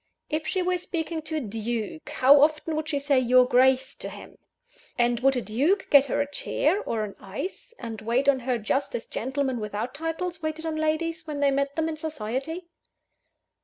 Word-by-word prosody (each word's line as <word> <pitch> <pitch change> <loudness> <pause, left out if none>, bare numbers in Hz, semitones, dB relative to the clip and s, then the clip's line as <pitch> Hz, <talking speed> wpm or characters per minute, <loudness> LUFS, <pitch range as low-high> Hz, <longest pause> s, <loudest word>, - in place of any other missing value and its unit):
If 310 +1 -1
she 370 - 0
were 360 0 0
speaking 330 -2 -3
to 315 +1 -5
a - - +1
duke, 225 +3 -4
how 275 +2 +6
often 310 +1 +2
would 310 0 -3
she 290 - 0
say 280 -1 +2
"your 250 0 +5
Grace" 260 +1 +3
to - - -6
him? - - -12 0.6
and 240 -1 +2
would 270 +1 +3
a 250 - 0
duke 295 - +1
get 280 -1 +8
her 275 - -1
a 285 - -1
chair, 340 +7 0
or 225 - -2
an 205 -2 -6
ice, 285 - -6
and 225 -3 -7
wait 240 +5 0
on 275 -2 +5
her 250 0 -1
just 235 +6 -1
as 230 - -4
gentlemen 265 0 -2
without 215 +3 -4
titles 325 +2 -3
waited 315 +1 -3
on 320 -1 -2
ladies, 320 +2 -1
when 295 -2 -4
they 285 -1 +3
met 280 +1 0
them 320 0 0
in 320 -1 -3
society? 305 +3 -4
280 Hz, 200 wpm, -26 LUFS, 245-320 Hz, 0.6 s, get